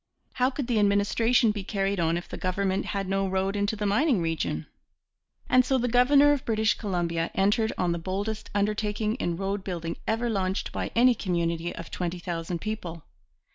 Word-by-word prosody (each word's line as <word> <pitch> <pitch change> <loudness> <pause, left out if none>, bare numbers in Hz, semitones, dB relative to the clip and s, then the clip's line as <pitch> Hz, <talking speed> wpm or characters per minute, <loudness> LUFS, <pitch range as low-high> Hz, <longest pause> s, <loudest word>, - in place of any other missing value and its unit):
How 255 0 +2
could 275 0 -4
the 235 -3 +1
administration 210 +4 +3
be 205 -2 -5
carried 195 -1 -1
on 165 0 +1
if 175 - -6
the - - -7
government 190 +1 -1
had 195 -2 -2
no 195 0 0
road 190 +1 -1
into 205 +2 0
the 210 -1 -3
mining 230 - +2
region? 160 - -2 0.8
And 255 0 +5
so 265 +1 +1
the 245 -1 0
governor 275 +4 +5
of 285 -2 0
British 220 -1 +2
Columbia 170 -5 -1
entered 210 +3 +2
on 180 -1 +1
the 170 - -1
boldest 200 +5 -4
undertaking 210 +1 0
in 170 -8 -2
roadbuilding 190 -4 -3
ever 225 +2 0
launched 195 -3 -1
by - - -3
any 245 +2 +6
community 170 -4 -1
of 170 - -8
twenty 180 0 -3
thousand 170 0 -4
people. 175 -7 -5
200 Hz, 175 wpm, -27 LUFS, 175-220 Hz, 0.8 s, any